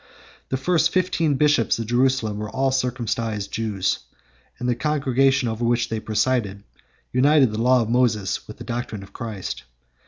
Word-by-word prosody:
The 130 - 0
first 170 +4 +2
fifteen 165 -5 +1
bishops 145 -4 +3
of 115 - -3
Jerusalem 120 -3 +1
were 105 0 -4
all 135 +4 0
circumcised 115 -5 -2
Jews; 105 -4 -1 0.6
and 125 - -3
the 125 - +3
congregation 135 -1 +1
over 110 +1 -3
which 120 0 +1
they 110 - -2
presided 110 -2 -1 0.5
united 135 -1 +4
the 110 +1 -2
law 125 0 +4
of 110 - -5
Moses 115 -6 +1
with - - -10
the - - -8
doctrine 115 -4 -4
of 95 - -15
Christ. 110 -6 -5
120 Hz, 160 wpm, -23 LUFS, 110-135 Hz, 0.6 s, united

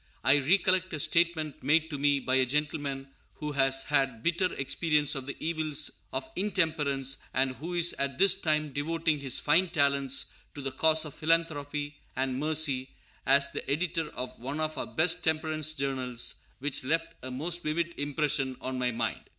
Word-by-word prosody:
I 140 +2 +6
recollect 185 +4 +3
a 155 - -2
statement 165 -2 +1
made 160 +4 +2
to 145 - -3
me 145 0 +3
by 130 -1 -2
a 130 - +4
gentleman 145 -1 -2 0.3
who 150 -1 -4
has 135 -1 +2
had 135 -6 0
bitter 175 +2 +1
experience 150 +1 +1
of 135 -1 -5
the 140 - -4
evils 155 -2 -1 0.2
of 130 0 -3
intemperance, 155 -9 0 0.2
and 130 0 +2
who 170 +6 -5
is 175 0 +4
at 140 -1 0
this 195 0 +6
time 155 -6 0
devoting 160 +1 0
his 135 -2 -1
fine 170 +5 +3
talents 140 -4 +1 0.3
to 145 - -6
the 135 - -1
cause 160 +4 +2
of 150 - -8
philanthropy 150 -3 0 0.2
and 130 0 -1
mercy, 145 -4 +1 0.4
as 140 +1 +4
the - - -6
editor 165 +1 0
of 125 - -6
one 135 +5 -4
of 155 0 -1
our - - -4
best 160 +1 +2
temperance 155 -1 0
journals, 130 -4 -2 0.2
which 140 0 -2
left 165 +4 -1
a 130 - -5
most 165 +7 -2
vivid 170 +2 -1
impression 145 -2 0
on 130 0 -4
my 125 -1 +1
mind. 115 -1 -2
145 Hz, 175 wpm, -29 LUFS, 135-160 Hz, 0.4 s, I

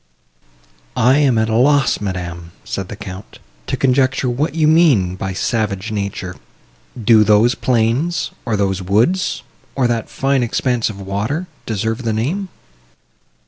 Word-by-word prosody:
"I 130 +5 +4
am 135 -5 +3
at 110 0 +2
a 110 - -1
loss, 135 0 +3
madam," 85 -3 -5
said 95 -2 -4
the 100 - -7
Count, 95 -1 -9 0.3
"to - - -2
conjecture 130 -1 +2
what 150 +6 -1
you 155 -2 +3
mean 145 - +4
by 95 0 -4
savage 105 0 -2
nature. 100 -3 -4 0.6
Do 110 -1 +5
those 105 +4 +4
plains, 125 +9 0
or 110 -4 -1
those 95 -1 0
woods, 115 - +1 0.3
or 130 - +1
that 120 -2 -1
fine 135 -1 0
expanse 120 0 0
of 100 -2 -8
water, 100 - -3 0.2
deserve 110 +2 -2
the 115 -3 -1
name?" 165 - -2
115 Hz, 140 wpm, -18 LUFS, 100-135 Hz, 0.6 s, Do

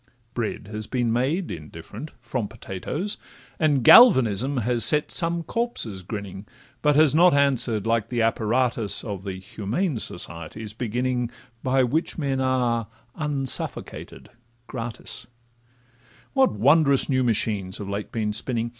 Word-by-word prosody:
Bread 110 -3 -4
has 110 0 -6
been 120 -3 0
made 145 +9 -1
(indifferent) 80 - -9
from 120 -1 -4
potatoes; 115 - -5 0.4
And 145 -5 +2
galvanism 130 - +6
has 120 -2 +2
set 150 +7 +4
some 170 -1 +2
corpses 165 - -3
grinning, 100 0 -7 0.3
But 150 -1 +3
has 155 -1 +5
not 175 0 +5
answer'd 130 -7 +2
like 115 -1 0
the 120 -2 0
apparatus 115 0 0
Of 100 -5 -5
the 95 -1 -5
Humane 110 - -3
Society's 85 +5 -6
beginning 125 +1 -2 0.3
By 130 0 +2
which 150 +7 -1
men 135 -4 -1
are 125 -4 0 0.3
unsuffocated 145 -4 -1 0.4
gratis: 115 0 -4 1.1
What 270 -1 +3
wondrous 140 +5 +3
new 130 -2 +1
machines 105 -4 -1
have 100 - -7
late 100 +1 -5
been 105 -2 -2
spinning! 115 +1 -2
120 Hz, 130 wpm, -24 LUFS, 105-140 Hz, 1.1 s, galvanism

